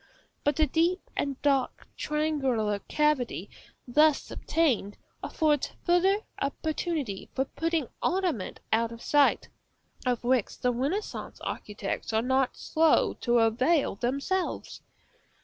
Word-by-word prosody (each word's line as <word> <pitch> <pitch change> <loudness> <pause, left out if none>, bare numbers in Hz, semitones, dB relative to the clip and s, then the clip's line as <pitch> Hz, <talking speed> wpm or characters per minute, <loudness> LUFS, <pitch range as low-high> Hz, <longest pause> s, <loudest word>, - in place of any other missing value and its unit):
But 290 0 +2
the 310 - +4
deep 335 +6 +1
and 275 -2 -2
dark 275 -3 +1
triangular 270 -9 0
cavity 265 - 0 0.4
thus 300 +4 +3
obtained 255 -11 0 0.2
affords 300 -3 0
farther 375 +4 +3 0.2
opportunity 290 - -2
for 265 - +1
putting 325 -1 -1
ornament 350 - -1
out 230 +1 +2
of 230 0 -10
sight, 290 -1 +3 0.6
of 250 -2 0
which 245 -3 +1
the 250 0 +1
Renaissance 290 - -3
architects 210 +1 -4
are 220 +1 +2
not 260 +1 +1
slow 320 0 +3
to 240 -1 +3
avail 255 +8 +3
themselves. 275 - -2
275 Hz, 115 wpm, -28 LUFS, 240-315 Hz, 0.6 s, the